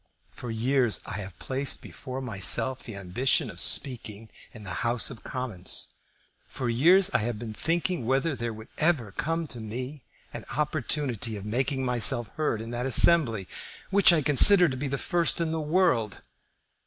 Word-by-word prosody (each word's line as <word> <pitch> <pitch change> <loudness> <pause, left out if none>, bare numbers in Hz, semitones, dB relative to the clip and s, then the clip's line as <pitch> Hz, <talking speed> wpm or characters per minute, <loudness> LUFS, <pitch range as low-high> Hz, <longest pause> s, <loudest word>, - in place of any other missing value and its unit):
For 125 - -9
years 120 +1 0
I - - -6
have 95 -2 -9
placed 135 +1 -1
before 130 0 -8
myself 125 +3 +2
the 115 - -9
ambition 100 +7 0
of - - -10
speaking 110 -4 0 0.2
in 110 - -13
the 95 -2 -6
House 120 +1 0
of 120 - -11
Commons; 120 -9 -3 0.5
for 125 -3 -4
years 175 +11 +4
I 130 - +1
have 115 0 -3
been 110 0 -7
thinking 165 - -2
whether 135 +4 0
there 120 -1 -4
would 110 0 -11
ever 150 - +1
come 165 +8 -3
to 120 - -6
me 125 +6 -7 0.3
an - - -7
opportunity 140 -6 -2
of 100 - -9
making 130 +4 -2
myself 120 -2 +2
heard 130 -8 -3
in 115 - -8
that 120 +2 -3
assembly, 120 - +3 0.4
which 200 -1 +6
I 160 -3 +1
consider 175 +7 +7
to 130 - -4
be 140 +2 -4
the 140 +1 -3
first 170 +3 0
in 165 -1 -1
the 160 -1 -3
world. 150 - 0
130 Hz, 170 wpm, -26 LUFS, 115-150 Hz, 0.5 s, consider